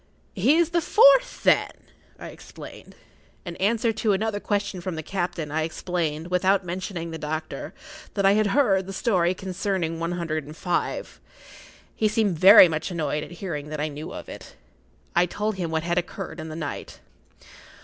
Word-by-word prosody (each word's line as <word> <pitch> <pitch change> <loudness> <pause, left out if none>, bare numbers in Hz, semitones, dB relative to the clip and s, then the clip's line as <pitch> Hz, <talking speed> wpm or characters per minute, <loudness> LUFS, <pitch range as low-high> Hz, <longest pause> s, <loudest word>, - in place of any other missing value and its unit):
"He 235 - +3
is 340 -1 +2
the 340 0 +2
fourth, - - +5
then?" - - +4 0.5
I - - -8
explained. - - -12 0.5
In 175 -1 -6
answer 225 +3 +1
to 215 -1 +1
another 205 +1 -1
question 205 -3 -2
from 180 -1 -4
the 160 - -5
captain, 175 -4 -3
I 160 +1 0
explained, 165 0 -3
without 185 +1 +2
mentioning 175 -1 -5
the 160 - -6
doctor, 155 +1 -5 0.4
that 200 -2 +1
I 195 - +6
had 215 +1 +3
heard 195 -6 +2
the 195 - -6
story 185 -4 +1
concerning 185 -3 -3
one 170 +1 -2
hundred 165 -3 -3
and 150 +3 -11
five. 175 -1 -3 0.7
He 220 - +2
seemed 210 -6 0
very 190 +1 +10
much 160 +1 -3
annoyed 150 -4 -2
at - - -9
hearing 165 -5 -6
that 155 -1 -5
I 155 +1 -1
knew 150 +1 -8
of - - -8
it. - - -11 0.6
I 175 +1 +4
told 210 +3 -3
him 175 -3 -2
what 160 0 -1
had 175 +1 +1
occurred 170 0 -7
in 160 0 -6
the 155 - -7
night. 155 -3 -6
180 Hz, 180 wpm, -24 LUFS, 160-205 Hz, 0.7 s, very